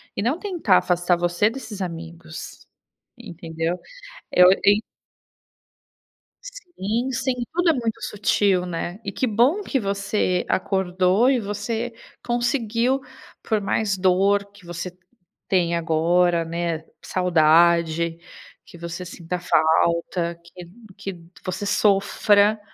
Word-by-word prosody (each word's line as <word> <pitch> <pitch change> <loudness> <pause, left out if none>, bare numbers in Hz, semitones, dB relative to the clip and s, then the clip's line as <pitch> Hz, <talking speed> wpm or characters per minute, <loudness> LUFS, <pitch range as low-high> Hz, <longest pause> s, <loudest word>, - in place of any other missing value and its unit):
e - - -2
não 265 +8 +1
tentar 345 - +2
afastar 175 0 +1
você 175 +4 +1
desses 220 -5 -8
amigos, 165 -2 -8 0.5
entendeu? 165 +1 -4 0.5
Eu 180 0 +7 0.2
em 205 +2 +5 1.6
Sim, 265 - -4
sim, 260 +1 -1 0.2
tudo 350 +1 +2
é - - 0
muito 230 -4 -3
sutil, 200 -2 +1
né. 175 +2 -4
E 200 - -4
que 260 - -1
bom 250 - +2
que 275 - -1
você 200 -3 -1
acordou 190 +4 +2
e 265 -2 +2
você 220 +3 -3 0.3
conseguiu, 240 +1 0 0.4
por 220 -2 0
mais 200 0 -1
dor 195 +2 +3
que 200 -2 -18
você 175 +1 -6 0.5
tenha 170 -3 +1
agora, 170 +1 +2
né, 165 -1 -3 0.2
saudade 170 -1 +3 0.5
que - - -14
você 170 +1 -6
sinta 175 0 -5
falta, 170 +1 +1
que 175 +1 -12 0.3
que 195 -4 -7 0.2
você 185 +2 -4
sofra, 205 +1 +3
185 Hz, 115 wpm, -23 LUFS, 170-220 Hz, 1.6 s, Eu